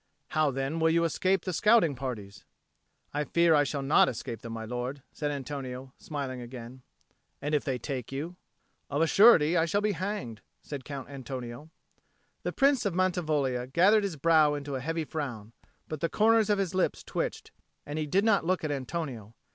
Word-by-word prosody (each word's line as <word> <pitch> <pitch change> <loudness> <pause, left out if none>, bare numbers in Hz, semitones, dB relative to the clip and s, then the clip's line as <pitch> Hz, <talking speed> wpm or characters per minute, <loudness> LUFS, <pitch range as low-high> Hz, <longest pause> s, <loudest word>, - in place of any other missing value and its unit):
"How, 155 -2 +2
then, 135 +4 -2
will 160 0 +4
you 170 +1 +3
escape 185 +3 +1
the 185 - -2
scouting 210 -4 +4
parties?" 110 -6 -6 0.7
"I 145 +1 0
fear 170 +2 +3
I 145 -1 +5
shall 140 -1 -3
not 140 +3 +5
escape 115 -2 -6
them, 115 -1 -7
my 115 -1 -5
lord," 125 +4 -4
said 150 - -2
Antonio, 135 -2 -5
smiling 135 -4 -5
again. 120 +1 -9 0.6
"And 145 +1 -3
if 150 - +2
they 130 -2 -1
take 130 0 -5
you?" 155 +6 -4 0.5
"Of 145 +3 +1
a - - +5
surety 175 -4 +6
I 165 -2 +3
shall 185 +5 +1
be 210 0 +1
hanged," 180 - -4 0.2
said 140 -3 -7
Count 140 -2 -6
Antonio. 130 +1 -7 0.7
The - - -2
Prince 275 -3 +3
of 195 -4 -1
Mantivoglia 155 -9 0
gathered 190 +10 +4
his 195 -5 -2
brow 155 0 +4
into 145 -1 -5
a 130 - -2
heavy 165 +3 -2
frown, 120 -9 -5 0.3
but 155 - -5
the 165 - 0
corners 220 0 +3
of 205 - +3
his 195 -2 -1
lips 185 -1 0
twitched, - - -4 0.3
and 145 +2 -4
he 155 - -2
did 195 +8 +2
not 210 -5 +4
look 185 +1 0
at 155 - -1
Antonio. 130 -6 -4
145 Hz, 185 wpm, -29 LUFS, 130-170 Hz, 0.7 s, surety